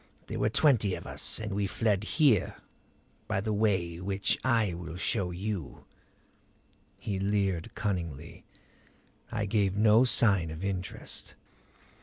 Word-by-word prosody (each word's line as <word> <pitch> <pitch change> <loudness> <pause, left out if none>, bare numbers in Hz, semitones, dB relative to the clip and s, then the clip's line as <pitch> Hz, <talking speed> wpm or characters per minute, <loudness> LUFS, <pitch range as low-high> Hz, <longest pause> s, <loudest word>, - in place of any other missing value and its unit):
There - - -5
were 105 - +2
twenty 110 -7 +3
of - - -9
us; - - -1
and 105 -2 -4
we 100 0 0
fled 105 -1 0
here 130 - +2 0.7
by - - 0
the 105 +2 -1
way 95 -6 +1
which 95 +2 0
I 115 -7 +2
will 85 0 -7
show 95 -1 0
you 90 -3 -5 0.6
" - - -36
He 100 -2 -3
leered 100 0 -1
cunningly; 85 -7 -4 0.9
I 105 - -1
gave 100 -2 +1
no 110 +2 +6
sign 100 -9 +3
of 80 +3 -7
interest. 95 -2 -5
100 Hz, 135 wpm, -29 LUFS, 90-110 Hz, 0.9 s, no